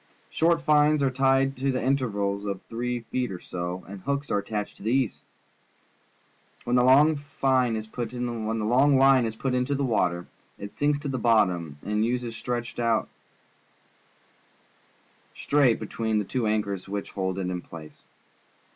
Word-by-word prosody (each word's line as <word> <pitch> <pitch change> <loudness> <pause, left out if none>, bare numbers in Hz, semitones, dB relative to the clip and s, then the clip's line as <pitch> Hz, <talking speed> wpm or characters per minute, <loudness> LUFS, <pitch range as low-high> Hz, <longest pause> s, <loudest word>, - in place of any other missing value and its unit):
Short 165 0 +2
fines 150 -1 +4
are 135 - +2
tied 135 +1 +2
to 135 +2 -2
it 130 - 0
at - - -1
intervals 105 -7 0
of 100 -2 -3
three 120 +1 -3
feet 125 +1 -3
or 90 - -6
so, 90 +1 -5
and 100 0 -9
hooks 140 +3 -2
are 100 - +2
attached 105 0 -5
to - - -17
these. 125 +1 0 1.4
TMien 120 - -1
the 125 0 +4
long 145 +5 +6
fine 135 -4 0
is 110 0 -4
put 115 +1 -5
into 120 -2 -3 1.4
the 140 - -1
water, 90 -8 0 0.3
it 100 0 -8
sinks 145 0 +1
to 145 0 -6
the 130 -2 -2
bottom 90 -10 +2
and 105 +1 0
Ues 120 0 -2
stretched 120 +1 -4
out 115 -2 +1 2.3
straight 140 -5 +2
between 110 0 -2
the 105 - 0
two 120 +2 -1
anchors 100 -3 -2
which 100 0 -4
hold 95 -1 -2
it 90 -1 -2
in 90 -1 -3
place. 80 -3 -12
115 Hz, 150 wpm, -26 LUFS, 100-135 Hz, 2.3 s, long